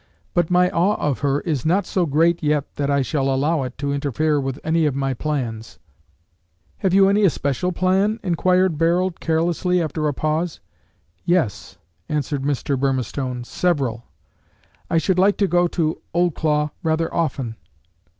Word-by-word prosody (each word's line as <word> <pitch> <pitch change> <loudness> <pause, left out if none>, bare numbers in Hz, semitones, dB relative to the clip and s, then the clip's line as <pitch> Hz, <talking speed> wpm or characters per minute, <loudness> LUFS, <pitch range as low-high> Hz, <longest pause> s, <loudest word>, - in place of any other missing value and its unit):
"But 175 -2 +1
my 180 0 +4
awe 190 +5 +2
of 145 - -1
her 140 0 0
is 150 -7 -2
not 180 +4 +2
so 180 -2 0
great 165 +4 +2
yet 150 -2 0
that 145 -1 -1
I 140 -1 +2
shall 135 0 0
allow 145 +4 +1
it 130 -1 -5
to 140 0 -2
interfere 145 +2 0
with 135 +1 -4
any 160 0 +2
of 140 - -1
my 135 -1 -1
plans." 120 -5 -4 1.0
"Have 190 - 0
you 195 +1 +5
any 205 +2 +3
especial 150 -2 +1
plan?" 190 +5 +1
inquired 180 -2 +2
Barold 175 +2 +1
carelessly, 170 +2 +1
after 155 -2 -1
a 145 - 0
pause. 155 +3 -1 0.6
"Yes," 150 - -1 0.3
answered 145 -2 -1
Mr. 140 0 -1
Burmistone, 130 -1 -2
"several. 130 -6 -1 0.8
I 165 - +2
should 185 +2 +1
like 200 +2 +4
to 200 - +2
go 175 -1 +3
to 160 -2 -2
Oldclough 155 -3 +1
rather 165 0 0
often." 135 -8 -2
155 Hz, 155 wpm, -21 LUFS, 140-175 Hz, 1.0 s, you